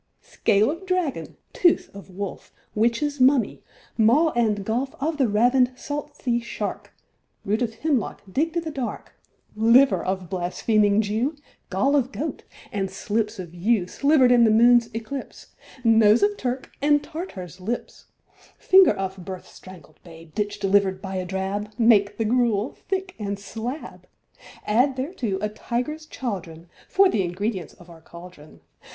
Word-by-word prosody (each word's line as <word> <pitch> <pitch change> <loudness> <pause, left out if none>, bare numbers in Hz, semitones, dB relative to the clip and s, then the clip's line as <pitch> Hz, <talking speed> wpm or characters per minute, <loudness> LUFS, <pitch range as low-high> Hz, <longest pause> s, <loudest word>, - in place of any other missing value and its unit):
THIRD - - -49
WITCH. - - -26
Scale 210 +6 +4
of 335 +5 -8
dragon, 365 -6 -2 0.2
tooth 360 0 +3
of 200 0 -11
wolf, 190 +1 -7 0.2
Witch's 240 +6 0
mummy, 260 -1 +3 0.4
maw 280 +9 +4
and 215 -5 0
gulf 245 +5 -2
Of 305 +2 -1
the 265 -4 +3
ravin'd 245 +4 +3
salt 290 +1 -6
sea 240 -2 0
shark, 215 -3 -5 0.5
Root 215 +4 0
of 225 -2 -2
hemlock 275 -9 -1
digg'd 315 - -1
i' - - +1
th' 320 -2 -6
dark, 260 -4 -5 0.4
Liver 235 +5 +5
of 185 -1 -3
blaspheming 205 +4 +1
Jew, 225 +9 -1 0.3
Gall 235 +10 +1
of 265 -2 +1
goat, 300 +1 -5 0.3
and 195 -2 -2
slips 210 +3 -2
of 175 -3 -8
yew 190 +2 +1
Sliver'd 275 - +3
in 240 -1 +6
the 225 - +5
moon's 235 +1 +5
eclipse, 245 +5 -7 0.3
Nose 225 - +5
of 410 0 +2
Turk, 255 -5 -4
and 290 0 +3
Tartar's 190 - -8
lips, 230 +6 -5 0.5
Finger 380 0 +6
of 190 -1 -5
birth 185 0 -8
strangled 180 -5 -15
babe 165 -2 -14
Ditch 205 -1 -2
deliver'd 195 -1 +2
by 190 0 -7
a 185 - -3
drab, 195 +3 -3
Make 220 -4 +4
the 225 - -1
gruel 230 -1 +1
thick 380 -1 -2
and 200 -1 -3
slab: 225 +8 -7 0.6
Add 250 +6 +2
thereto 260 - -3
a 210 - 0
tiger's 250 +8 -4
chaudron, 175 -9 -6 0.2
For 390 0 +5
th' - - -2
ingredients 185 +1 -3
of 175 - -17
our 165 -2 -14
cauldron. 170 -2 -14
225 Hz, 155 wpm, -24 LUFS, 195-270 Hz, 0.6 s, in